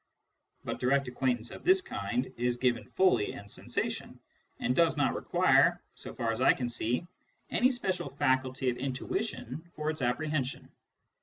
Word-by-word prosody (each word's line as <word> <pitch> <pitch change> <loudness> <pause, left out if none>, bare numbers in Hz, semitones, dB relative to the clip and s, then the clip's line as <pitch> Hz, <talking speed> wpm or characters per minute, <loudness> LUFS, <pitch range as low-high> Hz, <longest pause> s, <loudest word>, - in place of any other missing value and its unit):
But - - -4
direct 135 +2 +2
acquaintance 125 -2 -1
of - - -9
this 370 +2 +6
kind 120 - -3
is 120 0 0
given 120 -1 0
fully 180 - +3
in 100 - -9
sensation, - - -4 0.4
and 125 +1 0
does 165 -1 +3
not 145 - +2
require, - - +4
so - - -8
far 115 -1 -1
as 115 +2 -3
I - - +6
can 125 -2 -3
see, 120 +5 -1 0.5
any 250 - +4
special 195 -7 -2
faculty 130 -1 +1
of 120 - -6
intuition 135 - -3
for 155 0 -1
its 155 -2 -6
apprehension. 135 +2 -1
130 Hz, 155 wpm, -30 LUFS, 120-155 Hz, 0.5 s, this